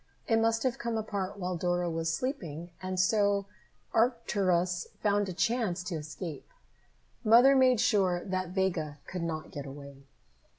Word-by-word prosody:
It 225 -1 +3
must 225 0 +2
have 255 -2 0
come 235 -1 -2
apart 205 -2 -3
while 180 -1 -2
Dora 175 +1 0
was 165 -1 -1
sleeping, 170 - -4
and 185 0 -3
so 200 +1 +3 0.5
Arcturus 190 -7 +1
found 205 -1 +1
a - - -2
chance 195 -2 0
to 180 -1 -4
escape. 155 +1 -7 0.7
Mother 245 +5 +7
made 255 -3 +5
sure 190 -6 +2
that 185 -2 -2
Vega 180 -6 -1
could 180 - -5
not 160 -2 -4
get 140 -1 -6
away. 140 0 -11
185 Hz, 145 wpm, -30 LUFS, 170-220 Hz, 0.7 s, Mother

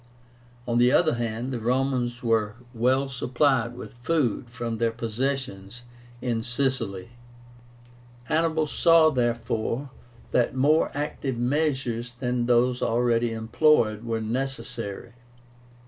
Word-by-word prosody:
On 120 0 +1
the 125 +1 +5
other 160 +2 +4
hand, 120 +2 -3
the 120 - -2
Romans 125 0 -1
were 115 -2 +1 0.2
well 130 +4 +2
supplied 125 -1 +1
with 125 - -9
food 125 -2 -1
from 115 -2 -4
their 115 -1 +2
possessions 115 -2 -4 0.4
in 120 -3 0
Sicily. 120 -5 -1 1.1
Hannibal 160 +3 +1
saw, 165 +1 +5
therefore, 120 +1 -1 0.4
that 125 +1 +1
more 150 +5 +3
active 145 -3 -3
measures 125 -3 -1
than 125 -1 -2
those 125 +1 +3
already 120 0 +1
employed 110 -1 +2
were 115 -1 -2
necessary. 120 -2 -4
120 Hz, 110 wpm, -26 LUFS, 115-135 Hz, 1.1 s, the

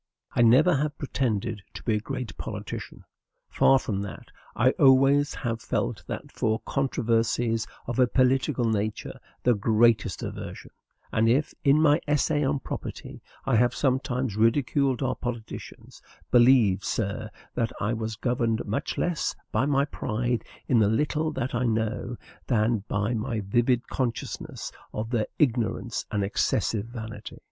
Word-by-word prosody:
I - - +3
never 140 +8 +6
have 150 +1 -2
pretended 115 -6 -2
to - - -8
be 115 - +1
a 105 - +1
great 125 +1 -5
politician; - - -7 0.5
far 135 - +5
from 105 -6 -2
that, 100 - -8 0.2
I 125 +3 +4
always 135 +1 +4
have 115 -3 -3
felt - - -2 0.3
for 110 0 0
controversies 115 -3 0 0.2
of 120 +1 -3
a 125 - +6
political 130 +1 +2
nature 110 -1 -2 0.2
the 125 - +4
greatest 110 -2 +2
aversion; - - -7 0.4
and 110 +1 +3
if, 135 +6 +2
in 140 +1 +5
my 150 0 +4
"Essay 150 +1 +2
on 135 0 0
Property," - - -7 0.2
I 130 -4 +3
have 120 +2 +3
sometimes 130 -4 0
ridiculed 130 +4 +2
our 130 -1 +1
politicians, 120 -3 -7 0.3
believe, 120 -6 +5
sir, 110 +1 -2 0.2
that 115 -3 -1
I 105 +3 0
was 110 -1 -3
governed 115 -1 0
much 105 - -3
less 175 -3 -1 0.2
by 115 +6 +1
my 140 -1 +3
pride 120 -3 -2 0.2
in 120 - +4
the 105 -2 +4
little 150 +6 0
that 125 -1 -3
I 125 +1 0
know, 115 +1 -1 0.3
than 115 -2 +2
by 105 +3 0
my 115 0 -2
vivid 120 +5 +1
consciousness 120 -3 -4 0.2
of 110 +2 -3
their 115 -4 +1
ignorance 120 -4 0
and 105 -2 0
excessive 105 +2 0
vanity. 115 -2 -8
120 Hz, 145 wpm, -26 LUFS, 110-135 Hz, 0.5 s, never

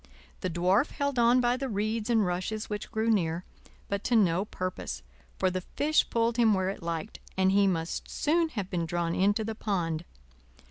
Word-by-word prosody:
The 185 - -2
Dwarf 185 - +2
held 280 -3 -1
on 240 +2 +5
by 245 0 +2
the 270 0 -3
reeds 215 +2 -1
and 225 -3 +3
rushes 185 +5 -3
which 210 0 -4
grew 225 +1 +1
near; 175 -4 0 0.4
but 200 0 -2
to 245 - +2
no 190 -3 +3
purpose, 185 - -5 0.3
for 185 -1 +2
the 185 0 -2
fish 300 - +1
pulled 230 0 +1
him 225 -3 +5
where 190 0 0
it 195 - -5
liked, 170 +4 -4 0.2
and 190 0 +4
he 200 0 +4
must 165 -3 -2
soon 330 +2 +1
have 200 -10 -5
been 170 -3 -1
drawn 170 0 -1
into 205 +4 +2
the 225 +1 -3
pond. 175 -7 -2
200 Hz, 190 wpm, -29 LUFS, 180-230 Hz, 0.4 s, on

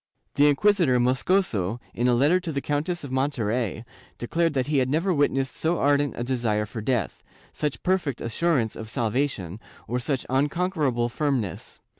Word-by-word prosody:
The 145 +1 +5
inquisitor 160 -4 +3
Moscoso, 125 - +1
in 120 +2 0
a 125 - +4
letter 145 +9 +4
to 175 -3 -5
the 140 - -1
Countess 150 +5 -2
of 140 - -7
Monterey, 120 -5 -1 0.3
declared 165 +5 0
that 130 -2 +1
he 145 -2 +1
had 130 -1 +1
never 165 +6 +1
witnessed 135 -3 +1
so 165 +2 0
ardent 145 -1 +2
a 120 - -2
desire 120 -4 0
for 110 +2 -7
death, 115 -3 -1 0.3
such 150 -2 -3
perfect 180 -9 0
assurance 120 -1 0
of 110 -1 -7
salvation, 115 - -2 0.3
or 120 +3 -1
such 130 +1 -2
unconquerable 145 -3 0
firmness. 120 - -3
135 Hz, 160 wpm, -25 LUFS, 120-150 Hz, 0.3 s, The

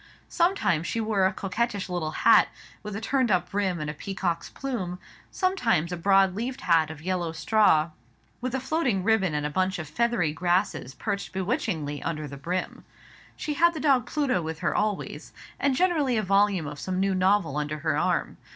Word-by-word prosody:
Sometimes 340 - +1
she 230 - -2
wore 215 -4 +2
a - - -1
coquettish 205 +1 -2
little 175 -4 -2 0.2
hat, - - +7 0.3
with 210 -1 -6
a 210 - -4
turned 260 +1 +1
up 180 -2 +1
brim 195 -3 0
and 150 - -3
a 150 - -3
peacock's 175 +1 -3
plume; 195 -10 -4 0.3
sometimes 235 - +1
a - - -1
broad 195 +1 +4
leaved 240 +6 -4
hat 165 -3 +3
of 160 -1 -9
yellow 180 -2 -1
straw, 165 -1 +3 0.5
with 255 +1 -2
floating 265 - 0
ribbon 195 -6 +2
and 150 0 -1
a 150 - -2
bunch 185 +4 0
of 160 -3 -6
feathery 175 -1 0
grasses 175 -4 0
perched 200 -3 -4
bewitchingly 180 - -2
upon 165 - -2
the 140 - -8
brim. 175 +7 -4 0.5
She 300 - -3
had 340 +3 +3
the - - -3
dog 270 -4 +3
Pluto 280 - 0
with 160 -1 -4
her 175 - +1
always, 210 -2 -2 0.3
and 280 -2 +2
generally 300 -7 +2
a 215 - +1
volume 195 -3 +2
of 145 0 -7
some 185 +4 -2
new 195 0 +1
novel 185 -5 +2
under 150 0 -2
her 155 +1 -1
arm. - - 0
190 Hz, 185 wpm, -26 LUFS, 165-235 Hz, 0.5 s, hat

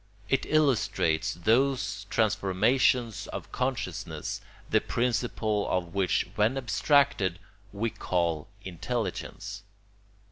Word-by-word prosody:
It 135 0 +1
illustrates 130 - +2
those 105 0 +1
transformations 110 +3 +2
of - - -7
consciousness 130 -1 -3 0.3
the - - +3
principle 115 -3 0
of 85 -2 -1
which, 95 -3 +1
when 110 +5 +2
abstracted, 135 - +2 0.3
we 110 +3 -2
call 85 -6 -1 0.2
intelligence. 95 +2 -4
110 Hz, 85 wpm, -28 LUFS, 95-125 Hz, 0.3 s, the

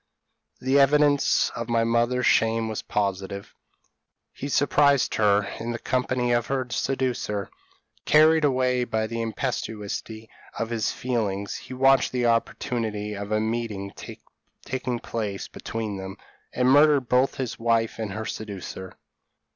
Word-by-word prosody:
The 130 +2 +2
evidence 145 0 +4
of 115 0 -6
my 115 -1 +2
mother's 120 +2 +1
shame 115 0 +3
was 110 -1 -3
positive; 100 -1 -3 0.8
he 140 - -6
surprised 140 -1 +3
her 105 -1 +3 0.2
in 120 +1 -3
the - - -3
company 125 0 0
of 120 -1 +1
her 135 -1 -1
seducer! 125 -7 -2 0.5
Carried 155 +1 +5
away 130 -3 +2
by 110 -2 -1
the 115 +1 -4
impetuosity 110 -2 -4 0.3
of 115 0 -3
his 115 -2 0
feelings, 105 -5 -2
he 130 - -9
watched 135 +1 +4
the 125 -1 0
opportunity 115 -2 -1
of 100 0 -6
a 110 - +2
meeting 110 -3 -3 0.7
taking 125 -1 -2
place 105 -4 -4
between 110 -3 -5
them, 95 +1 -7 0.3
and 125 +1 +2
murdered 145 -2 +5
both 125 +2 +2
his 130 -4 -4
wife 115 -1 +1
and 105 -3 -3
her 110 +1 -4
seducer. 95 -3 -7
115 Hz, 135 wpm, -25 LUFS, 110-130 Hz, 0.8 s, Carried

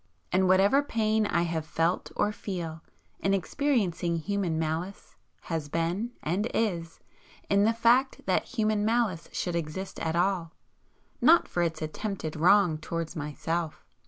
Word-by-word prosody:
And 185 +1 +3
whatever 195 +9 +5
pain 220 -5 +1
I 170 -3 +1
have 165 -2 -2
felt 165 +3 -1
or 210 - +1
feel, 170 -6 -5 0.4
in 195 0 +2
experiencing 195 - 0
human 185 -1 -1
malice, 160 +5 -3 0.3
has 160 -3 -4
been, 175 +10 -1
and 190 +8 0
is, 170 -7 -1 0.5
in 200 +1 +4
the 225 - +4
fact 240 +4 +3
that 185 - +1
human 215 -2 +1
malice 220 -6 0
should 175 -2 -2
exist 170 +4 -4
at 160 0 -1
all, 175 -2 0 0.7
not 335 +2 +6
for 175 - -1
its 165 -2 -1
attempted 160 0 -4
wrong 175 0 +4
towards 165 +1 -4
myself. 155 +1 -3
180 Hz, 140 wpm, -28 LUFS, 165-210 Hz, 0.7 s, not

